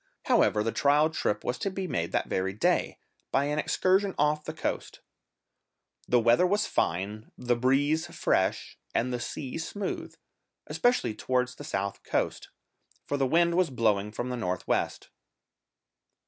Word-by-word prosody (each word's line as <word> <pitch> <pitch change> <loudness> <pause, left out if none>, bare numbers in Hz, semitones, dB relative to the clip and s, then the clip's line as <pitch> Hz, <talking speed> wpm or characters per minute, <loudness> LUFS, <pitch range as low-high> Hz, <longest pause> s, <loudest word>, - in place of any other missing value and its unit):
However 105 - +3
the 115 - 0
trial 150 +5 +3
trip 105 -9 -1
was 125 0 -2
to - - -1
be 190 0 -4
made 85 - -2
that - - 0
very 95 +1 -1
day, 105 - +1 0.3
by 140 - +2
an 150 +1 -1
excursion 190 +4 +2
off 150 +1 +2
the - - -3
coast. - - -4 1.1
The 120 - +4
weather 120 +10 +4
was 205 +3 +1
fine, 100 +6 -2
the 125 -1 +1
breeze 140 +6 +2
fresh, - - 0 0.2
and 125 +2 +1
the 125 - -2
sea 130 +4 -5
smooth, 195 +4 -4 0.5
especially 245 - +1
towards 125 +3 -1
the - - -10
south 100 0 -3
coast, - - -2 0.6
for - - -2
the 135 -2 +1
wind 170 +4 +3
was 180 -1 +2
blowing 105 -5 +1
from 120 +3 -4
the 125 - -3
north 90 -5 -3
west. - - -1
125 Hz, 155 wpm, -28 LUFS, 110-160 Hz, 1.1 s, The